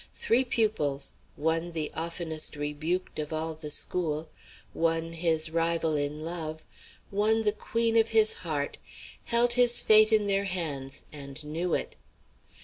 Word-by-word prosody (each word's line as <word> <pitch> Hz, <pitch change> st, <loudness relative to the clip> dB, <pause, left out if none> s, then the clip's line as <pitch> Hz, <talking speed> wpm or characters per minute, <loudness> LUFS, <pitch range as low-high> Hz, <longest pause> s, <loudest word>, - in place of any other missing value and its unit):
Three 240 Hz, +3 st, +2 dB
pupils, 185 Hz, -, 0 dB, 0.2 s
one 165 Hz, +3 st, -1 dB
the 155 Hz, -2 st, -2 dB
oftenest 160 Hz, -1 st, -3 dB
rebuked 155 Hz, +6 st, -3 dB
of 150 Hz, 0 st, -4 dB
all 160 Hz, +1 st, -2 dB
the 155 Hz, -1 st, -8 dB
school, 155 Hz, 0 st, -1 dB, 0.4 s
one 165 Hz, 0 st, -1 dB
his 160 Hz, -1 st, +1 dB
rival 165 Hz, -1 st, 0 dB
in 150 Hz, +1 st, -3 dB
love, 160 Hz, -2 st, -5 dB, 0.5 s
one 215 Hz, +2 st, +2 dB
the 210 Hz, -, +4 dB
queen 230 Hz, +2 st, 0 dB
of 225 Hz, 0 st, +4 dB
his 220 Hz, -1 st, +5 dB
heart, 150 Hz, -4 st, -3 dB, 0.5 s
held 240 Hz, +1 st, +3 dB
his 245 Hz, -1 st, +5 dB
fate 215 Hz, 0 st, +6 dB
in 215 Hz, -1 st, +4 dB
their 200 Hz, 0 st, +1 dB
hands 145 Hz, -7 st, -4 dB
and 140 Hz, 0 st, -8 dB
knew 165 Hz, +4 st, -2 dB
it. -, -, -5 dB
165 Hz, 140 wpm, -28 LUFS, 155-210 Hz, 0.5 s, fate